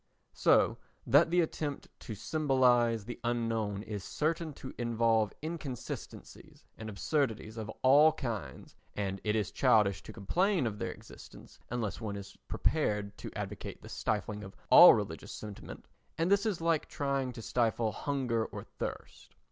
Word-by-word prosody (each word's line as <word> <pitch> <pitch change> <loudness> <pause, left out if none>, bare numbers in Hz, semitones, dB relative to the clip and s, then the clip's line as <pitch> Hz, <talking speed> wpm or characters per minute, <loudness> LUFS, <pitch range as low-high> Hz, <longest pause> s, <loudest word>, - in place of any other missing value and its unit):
So - - +3 0.3
that 145 +7 +5
the 175 +1 +4
attempt 150 -3 -3
to 110 - -7
symbolise 125 -5 +2
the 120 - -7
unknown 115 -4 -1
is 105 -3 -5
certain 160 +1 -1
to 130 - -9
involve 115 -2 +2
inconsistencies 155 -6 -7
and 110 0 -7
absurdities 110 -1 -1
of 110 -2 -6
all 145 +4 +7
kinds 120 - -6 0.2
and 100 -1 -3
it 105 0 +1
is 105 -4 -1
childish 105 -7 +3
to - - -10
complain 175 - +1
of 105 -2 -3
their - - -2
existence - - -14
unless 115 -3 -3
one 105 -2 -4
is 100 -1 -9
prepared 105 -9 0
to - - -6
advocate - - -6
the - - -10
stifling 105 -1 -2
of 95 - -10 0.2
all - - +11
religious - - -4
sentiment, 105 -2 -9 0.3
and 165 +3 +1
this 200 +2 +3
is 195 -6 -2
like 165 -2 +1
trying 140 -2 -1
to 115 -1 -9
stifle 115 -2 +1
hunger 125 -2 -1
or - - -7 0.2
thirst. - - -7
115 Hz, 150 wpm, -31 LUFS, 105-145 Hz, 0.3 s, all